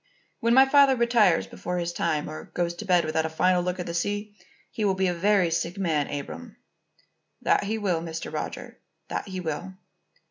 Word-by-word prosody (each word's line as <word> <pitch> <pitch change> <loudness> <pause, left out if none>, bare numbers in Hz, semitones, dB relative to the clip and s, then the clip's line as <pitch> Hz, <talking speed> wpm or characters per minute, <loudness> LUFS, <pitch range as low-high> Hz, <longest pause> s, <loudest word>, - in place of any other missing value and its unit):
'" - - -42
"When 230 +1 +2
my 265 0 +8
father 275 -1 +5
retires 235 -7 +3
before 180 - -5
his 170 0 -2
time 150 -3 -1
or 155 0 -7
goes 175 -1 0
to 195 +5 -8
bed 180 -4 +3
without 160 0 0
a - - -6
final 180 +3 +2
look 180 +1 -3
at 180 - -3
the 170 - -5
sea, 205 +4 -2 0.4
he 220 - -3
will 195 -2 +2
be 190 0 +1
a 180 - +1
very 185 0 +2
sick 170 +3 -2
man, 160 -7 0
Abram." 85 - -7 0.9
"That - - +2
he 220 +2 -1
will, 185 -6 0
Mr. 165 -1 -6
Roger; - - -6 0.3
that - - -3
he 190 -1 -5
will. 175 +3 -4
180 Hz, 205 wpm, -26 LUFS, 165-205 Hz, 0.9 s, my